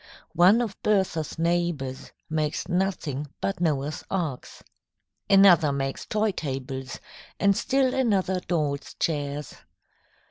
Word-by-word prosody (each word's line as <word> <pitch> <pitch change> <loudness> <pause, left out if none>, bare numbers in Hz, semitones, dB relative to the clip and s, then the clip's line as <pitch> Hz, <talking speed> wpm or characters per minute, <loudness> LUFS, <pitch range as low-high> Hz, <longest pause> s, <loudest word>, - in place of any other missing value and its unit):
One 185 +8 +5
of 215 -4 -6
Bertha's 190 -7 0
neighbours 165 -6 -1 0.2
makes 155 -1 -2
nothing 175 -6 -1
but 195 -2 -2
Noah's 150 -3 -1
Arks. 165 -9 -4 0.7
Another 190 -7 +6
makes 135 -1 -3
toy 215 0 +1
tables, 135 -5 -5 0.4
and 200 -1 +4
still 265 +2 +1
another 200 -8 +1
dolls' 150 -6 -2
chairs. 145 -2 -2
170 Hz, 105 wpm, -26 LUFS, 145-195 Hz, 0.7 s, Another